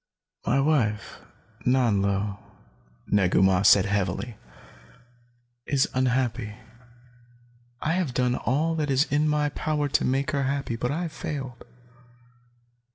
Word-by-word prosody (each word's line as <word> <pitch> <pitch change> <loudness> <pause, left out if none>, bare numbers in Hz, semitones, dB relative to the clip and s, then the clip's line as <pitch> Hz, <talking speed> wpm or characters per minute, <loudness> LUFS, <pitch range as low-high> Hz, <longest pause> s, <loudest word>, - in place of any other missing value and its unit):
"My 135 - +3
wife, 135 -8 0 0.4
Nanlo," 100 -5 +1 0.7
Negu 95 -2 +3
Mah 95 -1 +4
said 100 -1 +6
heavily, 100 +3 -2 1.3
"is 135 -2 +2
unhappy. 125 -4 0 1.3
I 160 - +1
have 170 -8 -1
done 125 -1 +2
all 150 +7 0
that 150 -2 -1
is 135 +1 +3
in 150 +2 +2
my 150 0 +1
power 150 0 -1
to 140 - +1
make 135 +3 0
her 140 -2 0
happy, 135 -3 -2
but 125 +2 -2
I 160 +6 -2
have 165 - -4
failed. 135 -4 -6
130 Hz, 120 wpm, -26 LUFS, 105-145 Hz, 1.3 s, said